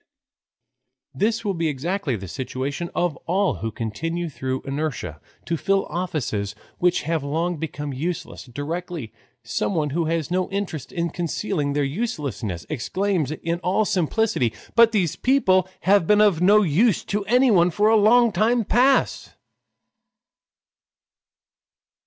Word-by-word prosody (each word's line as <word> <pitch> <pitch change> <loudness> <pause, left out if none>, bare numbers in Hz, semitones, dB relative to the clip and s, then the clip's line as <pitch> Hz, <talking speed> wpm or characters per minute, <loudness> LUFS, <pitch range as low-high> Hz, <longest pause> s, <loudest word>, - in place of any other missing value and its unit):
This 225 +2 0
will 200 - +1
be 165 -2 -1
exactly 155 +1 -2
the 95 -2 -7
situation 135 - -4
of 175 -4 0
all 185 -3 +1
who 115 - -3
continue 160 +11 -3
through 130 -2 -4
inertia 135 - -4 0.2
to 170 - -1
fill 195 +3 +1
offices 130 - -2 0.2
which 180 0 +2
have 160 -1 -1
long 165 +4 -1
become 145 -2 -5
useless 160 +6 -4
directly 145 0 -5 0.3
someone 150 - -1
who 165 +3 0
has 165 0 -1
no 185 0 0
interest 190 -9 -4
in 170 -1 -2
concealing 170 -3 -2
their 145 0 +1
uselessness 140 - -3
exclaims 170 - -1
in 170 +2 -3
all 190 +4 +1
simplicity: 185 - 0 0.2
"But 230 -1 +6
these 185 -8 +1
people 190 -9 +2
have 195 -3 +3
been 210 0 +5
of 205 -6 +4
no 210 +3 +6
use 195 +5 +2
to 205 0 -1
anyone 215 -6 +4
for 205 +5 +2
a 225 - +5
long 230 +2 +5
time 225 +4 +2
past!" 255 +6 +2
170 Hz, 135 wpm, -23 LUFS, 145-200 Hz, 0.3 s, But